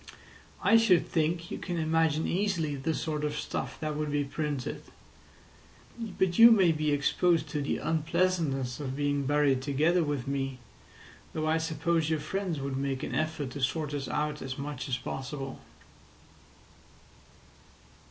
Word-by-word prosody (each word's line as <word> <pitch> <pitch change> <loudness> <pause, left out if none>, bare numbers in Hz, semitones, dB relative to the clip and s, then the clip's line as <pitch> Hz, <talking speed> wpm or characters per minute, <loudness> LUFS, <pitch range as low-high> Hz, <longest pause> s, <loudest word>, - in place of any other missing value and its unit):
I 225 - +6
should 200 -7 +4
think 165 +1 -1
you - - -4
can 175 -2 -4
imagine 160 -1 +2
easily 170 -6 0
the 145 +4 -1
sort 150 -2 -2
of 150 0 -1
stuff - - -4
that 155 -1 -2
would 150 0 -2
be 145 0 +1
printed. 145 -2 -3 1.4
But 185 0 +1
you 230 +1 +11
may 195 -7 +5
be 155 -1 0
exposed 165 +4 +2
to 150 - -2
the 140 - -1
unpleasantness 155 -5 0
of 135 -3 -4
being 145 -1 0
buried 145 -2 +3
together 155 +6 +2
with 145 -4 -2
me, 135 -1 -2 0.8
though 155 -1 -2
I 160 +1 +2
suppose 160 0 0
your 160 -1 +1
friends 175 +1 -3
would 135 -1 -3
make 135 -1 -2
an - - -4
effort 155 -4 -2
to 140 - -6
sort 150 +3 -1
us 140 -3 -3
out 150 0 -2
as 130 0 -5
much 140 -1 -5
as 125 - 0
possible." 135 +2 -5
150 Hz, 150 wpm, -29 LUFS, 140-165 Hz, 1.4 s, you